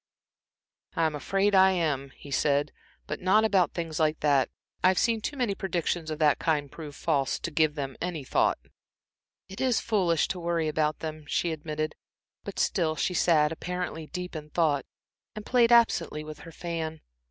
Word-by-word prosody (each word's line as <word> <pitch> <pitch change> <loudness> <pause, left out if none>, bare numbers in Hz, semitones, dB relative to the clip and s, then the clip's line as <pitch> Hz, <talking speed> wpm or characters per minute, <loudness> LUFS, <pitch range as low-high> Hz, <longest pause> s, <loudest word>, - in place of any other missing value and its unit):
"I'm 160 -2 +1
afraid 195 +8 +1
I 190 0 +6
am," 150 -6 -1
he 145 - -12
said, 140 +1 +1 0.3
"but 150 - -5
not 210 +4 +4
about 195 -5 +2
things 165 -3 -3
like 155 -1 +2
that. 140 -3 +3 0.3
I've 185 0 +4
seen 230 -2 +2
too 285 - -4
many 245 -6 +1
predictions 175 -3 -2
of 155 - -3
the 150 -2 +4
kind 145 -4 0
prove 150 -3 -9
false, 140 -5 0
to 170 - -5
give 155 -1 +2
them 135 -3 -4
a 170 -4 -3
thought." - - +2 0.9
"It 195 - -8
is 255 -3 +2
foolish 180 -8 +1
to 185 - -3
worry 170 -2 0
about 155 0 0
them," 155 -1 -6
she 170 +2 0
admitted, 155 0 -3 0.5
but - - -7
still 160 -4 +1
she 180 - -1
sat 155 -3 +3
apparently 175 -1 -4
deep 180 +1 -6
in 150 -1 -7
thought 150 -4 +1 0.5
and 215 -1 -7
played 240 -2 +4
absently 230 -9 +3
with 155 -1 -9
her 165 - -11
fan. 160 -1 -4
160 Hz, 175 wpm, -28 LUFS, 150-180 Hz, 0.9 s, I